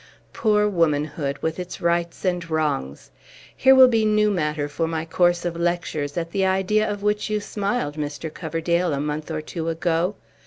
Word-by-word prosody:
Poor 210 Hz, -2 st, +2 dB
womanhood, 150 Hz, -5 st, 0 dB
with 160 Hz, +2 st, -1 dB
its 180 Hz, 0 st, -6 dB
rights 170 Hz, +1 st, -1 dB
and 175 Hz, -2 st, -1 dB
wrongs! 150 Hz, -, -2 dB, 0.4 s
Here 265 Hz, 0 st, +6 dB
will 260 Hz, -1 st, +9 dB
be 225 Hz, -3 st, +2 dB
new 210 Hz, 0 st, +3 dB
matter 150 Hz, -5 st, -1 dB
for 160 Hz, +3 st, -2 dB
my 160 Hz, -1 st, -3 dB
course 175 Hz, +1 st, +2 dB
of 170 Hz, -1 st, -2 dB
lectures, 170 Hz, -4 st, -2 dB
at 165 Hz, -1 st, -3 dB
the 195 Hz, +1 st, 0 dB
idea 190 Hz, +3 st, +2 dB
of 205 Hz, -1 st, -4 dB
which 210 Hz, 0 st, 0 dB
you 210 Hz, 0 st, 0 dB
smiled, 200 Hz, -6 st, -2 dB
Mr. 150 Hz, +1 st, -4 dB
Coverdale, 170 Hz, 0 st, -1 dB
a 140 Hz, -, -1 dB
month 150 Hz, +2 st, -3 dB
or 155 Hz, -1 st, -3 dB
two 165 Hz, +1 st, -4 dB
ago. 165 Hz, +3 st, 0 dB
170 Hz, 180 wpm, -23 LUFS, 155-195 Hz, 0.4 s, will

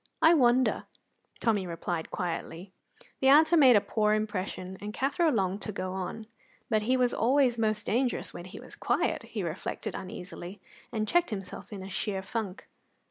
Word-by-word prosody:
"I 325 Hz, -, +6 dB
wonder," 255 Hz, -4 st, +3 dB, 0.5 s
Tommy 210 Hz, -5 st, +1 dB
replied 170 Hz, -1 st, -3 dB
quietly. 180 Hz, +1 st, -4 dB, 0.5 s
The 265 Hz, -, +2 dB
answer 315 Hz, +5 st, +7 dB
made 265 Hz, -7 st, +7 dB
a 205 Hz, -, +5 dB
poor 215 Hz, 0 st, +1 dB
impression, 190 Hz, -3 st, -3 dB
and 210 Hz, +1 st, -6 dB
Cathro 285 Hz, +5 st, +2 dB
longed 195 Hz, -6 st, 0 dB
to 210 Hz, -, -4 dB
go 185 Hz, -2 st, -4 dB
on. 190 Hz, +4 st, -5 dB, 0.5 s
"But 215 Hz, -1 st, +3 dB
he 250 Hz, +4 st, +2 dB
was 250 Hz, -1 st, +2 dB
always 250 Hz, 0 st, +3 dB
most 215 Hz, -1 st, 0 dB
dangerous 245 Hz, +2 st, 0 dB
when 175 Hz, -, -8 dB
he 185 Hz, -, -9 dB
was -, -, -11 dB
quiet," -, -, 0 dB
he -, -, -5 dB
reflected -, -, -4 dB
uneasily, 185 Hz, +1 st, -7 dB, 0.3 s
and 215 Hz, -1 st, -1 dB
checked 350 Hz, +5 st, +2 dB
himself 195 Hz, -1 st, -7 dB
in 190 Hz, -2 st, -6 dB
sheer 190 Hz, +1 st, -2 dB
funk. 205 Hz, -2 st, -5 dB
210 Hz, 165 wpm, -29 LUFS, 190-245 Hz, 0.5 s, answer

